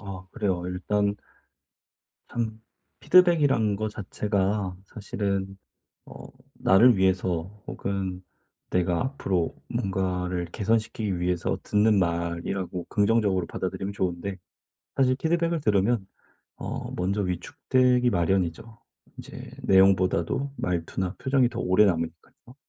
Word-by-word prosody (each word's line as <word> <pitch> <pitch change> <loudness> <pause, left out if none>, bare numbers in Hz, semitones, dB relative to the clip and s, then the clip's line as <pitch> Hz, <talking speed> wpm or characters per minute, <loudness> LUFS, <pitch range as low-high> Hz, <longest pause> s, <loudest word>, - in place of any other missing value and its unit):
아 95 -2 -8
그래요. 95 -7 -1
일단 100 +3 0 1.1
참 110 -2 -3 0.4
피드백이란 145 - +4
거 110 +1 -2
자체가 100 -2 -1
사실은 100 -1 -3 0.5
어 - - -11 0.3
나를 115 +4 +5
위해서 95 +1 0
혹은 95 -2 -4 0.5
내가 90 -1 +1
앞으로 95 -10 -1
뭔가를 90 -2 -2
개선시키기 105 0 -1
위해서 90 -1 0
듣는 105 0 +3
말이라고 85 +1 -2
긍정적으로 100 -4 +2
받아들이면 95 +2 -4
좋은데 95 0 -3 0.6
사실 130 -1 +3
피드백을 165 +1 0
들으면 105 -1 +2 0.5
어 - - -5
먼저 100 +3 -1
위축되기 125 +7 +1
마련이죠. 95 +4 -1 0.4
인제 - - -9
내용보다도 95 +6 +3
말투나 90 +2 -2
표정이 130 -2 +2
더 - - -6
오래 95 +4 +4
남으니깐요. 85 - -4
95 Hz, 270 characters per minute, -26 LUFS, 90-110 Hz, 1.1 s, 나를